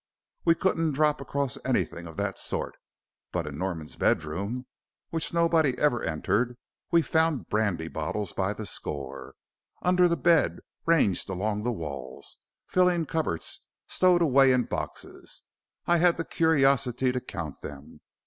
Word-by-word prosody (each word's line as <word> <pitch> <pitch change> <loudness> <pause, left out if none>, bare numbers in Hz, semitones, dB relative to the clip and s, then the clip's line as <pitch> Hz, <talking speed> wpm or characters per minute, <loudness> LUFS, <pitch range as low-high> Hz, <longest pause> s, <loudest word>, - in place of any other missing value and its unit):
We 165 -1 +5
couldn't 165 -4 +1
drop 150 0 +2
across 140 -2 -2
anything 85 0 -1
of 80 - -11
that - - -2
sort, - - -2 0.6
but 85 -3 -2
in 75 0 -6
Norman's 85 -5 -4
bedroom, 100 +11 -1 0.5
which 165 -1 -1
nobody 165 -5 +3
ever 135 -6 +2
entered, 105 +10 0 0.3
we 170 -1 +4
found 160 -4 +1
brandy 100 -7 0
bottles 80 +5 -3
by 95 +1 0
the 105 +1 -6
score. 70 -7 -5 0.5
Under 180 0 +4
the 170 -1 +1
bed, 170 -2 +3 0.3
ranged 135 - +3
along 105 +3 -1
the 120 +3 0
walls, 70 - -6 0.3
filling 180 -2 +2
cupboards, 155 - -2 0.2
stowed 180 -2 +4
away 135 -3 +5
in 125 -1 +3
boxes. - - -6 0.4
I 175 - +4
had 170 0 +4
the 165 - -2
curiosity 135 -5 +2
to 125 0 -2
count 85 - -6
them. 75 0 -10
125 Hz, 140 wpm, -27 LUFS, -, 0.6 s, We